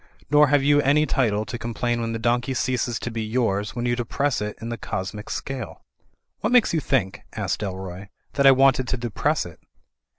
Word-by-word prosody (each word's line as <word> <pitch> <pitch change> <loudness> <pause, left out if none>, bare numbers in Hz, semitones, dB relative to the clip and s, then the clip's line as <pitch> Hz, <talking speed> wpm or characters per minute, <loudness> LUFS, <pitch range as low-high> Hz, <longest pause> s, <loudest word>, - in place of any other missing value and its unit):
Nor 150 0 +6
have 145 0 +3
you 145 +1 +4
any 145 +2 +3
title 110 -7 +1
to 120 - -6
complain 120 0 -2
•when 115 -1 -2
the 115 - -2
donkey 120 +3 0
ceases 125 -2 0
to 120 - -5
be 115 0 -3
yours 110 -3 -1
when 120 0 -2
you 120 0 +1
depress 125 +2 -1
it 105 0 -4
in 115 - -6
the 120 - -2
cosmic 100 +3 -5
scale." 135 -4 -5 0.6
"What 215 - -1
makes 245 -7 +4
you 165 - +2
think," 120 -10 0
asked - - -2
Dalroy, 95 -1 -6 0.3
"that 140 -1 +4
I - - +10
wanted 130 -1 +4
to 130 - -1
depress 125 +6 -1
it?" 85 -2 -11
120 Hz, 200 wpm, -24 LUFS, 110-135 Hz, 0.6 s, I